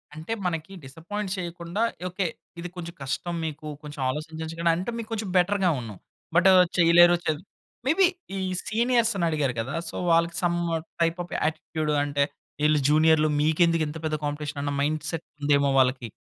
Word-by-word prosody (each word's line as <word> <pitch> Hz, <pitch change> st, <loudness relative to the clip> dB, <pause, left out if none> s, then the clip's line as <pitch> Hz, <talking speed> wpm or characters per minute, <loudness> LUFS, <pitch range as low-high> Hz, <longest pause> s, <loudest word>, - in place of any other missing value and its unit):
అంటే, 160 Hz, +7 st, -7 dB
మనకి 170 Hz, +2 st, -3 dB
డిసప్పాయింట్ 185 Hz, +8 st, -5 dB
చేయకుండా 175 Hz, +2 st, -4 dB, 0.3 s
ఓకే. 185 Hz, +1 st, -1 dB, 0.3 s
ఇది 175 Hz, +1 st, -5 dB
కొంచెం 170 Hz, -1 st, -7 dB
కష్టం 170 Hz, +6 st, -3 dB
మీకు 155 Hz, 0 st, -6 dB, 0.2 s
కొంచెం 145 Hz, -2 st, -7 dB
ఆలోచించండి 160 Hz, +3 st, -3 dB
అంటే 185 Hz, +7 st, -3 dB
మీకు 230 Hz, -1 st, -6 dB
కొంచెం 215 Hz, -3 st, -3 dB
బెటర్‌గా 190 Hz, 0 st, +3 dB
ఉన్ను. 115 Hz, -4 st, -7 dB, 0.4 s
బట్ 185 Hz, +3 st, +6 dB, 0.3 s
చేయలేరు 175 Hz, 0 st, +7 dB
చె -, -, +3 dB, 0.5 s
మే 270 Hz, -, +4 dB
బీ 385 Hz, -, +8 dB, 0.3 s
ఈ -, -, -3 dB, 0.3 s
సీనియర్స్‌ని 230 Hz, -4 st, +2 dB
అడిగారు 145 Hz, -5 st, 0 dB
కదా! 130 Hz, +5 st, -5 dB, 0.2 s
సో, -, -, -9 dB, 0.2 s
వాళ్ళకి 170 Hz, 0 st, +3 dB
సం 175 Hz, -1 st, +2 dB, 0.5 s
టైప్ 165 Hz, +1 st, +2 dB
ఆఫ్ 175 Hz, -, -13 dB
యాటిట్యూడ్ 155 Hz, 0 st, -2 dB
అంటే, 145 Hz, 0 st, +1 dB, 0.4 s
ఈళ్ళు 150 Hz, 0 st, +4 dB
జూనియర్‌లు 155 Hz, 0 st, +4 dB
మీకెందుకింత 160 Hz, 0 st, +2 dB
పెద్ద 155 Hz, -1 st, 0 dB
కాంపిటీషన్ 145 Hz, 0 st, -4 dB
అన్న 145 Hz, -, -1 dB
మైండ్‌సెట్ 155 Hz, +2 st, -2 dB, 0.2 s
ఉందేమో 145 Hz, -1 st, +3 dB
వాళ్ళకి. 130 Hz, -2 st, +1 dB
165 Hz, 150 wpm, -26 LUFS, 150-175 Hz, 0.5 s, బీ